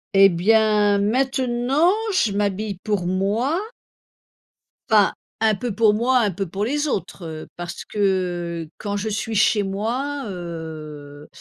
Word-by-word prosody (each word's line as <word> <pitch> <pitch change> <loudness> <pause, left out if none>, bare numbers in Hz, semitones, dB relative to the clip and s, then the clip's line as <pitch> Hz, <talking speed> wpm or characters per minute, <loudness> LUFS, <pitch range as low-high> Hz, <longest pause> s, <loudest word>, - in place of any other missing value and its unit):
Et 195 0 +8
bien, 210 +2 +3
maintenant, 255 - +2 0.2
je 230 - +2
m'habille 200 0 -1
pour 205 -5 -1
moi. 210 - 0 1.3
Enfin, 210 -3 +5 0.3
un 220 -2 +3
peu 235 +2 -4
pour 215 0 +4
moi, 250 +4 +2
un 210 -4 +2
peu 195 +2 -3
pour 195 +4 -3
les 290 +5 0
autres, 195 -7 -3
heu, 155 -1 -7
parce 175 0 -6
que 175 -4 -1
quand 205 -1 -3
je 215 +2 -2
suis 215 +2 -3
chez 215 0 +3
moi, 245 +9 -2
heu 155 -5 -8
205 Hz, 135 wpm, -22 LUFS, 180-230 Hz, 1.3 s, Et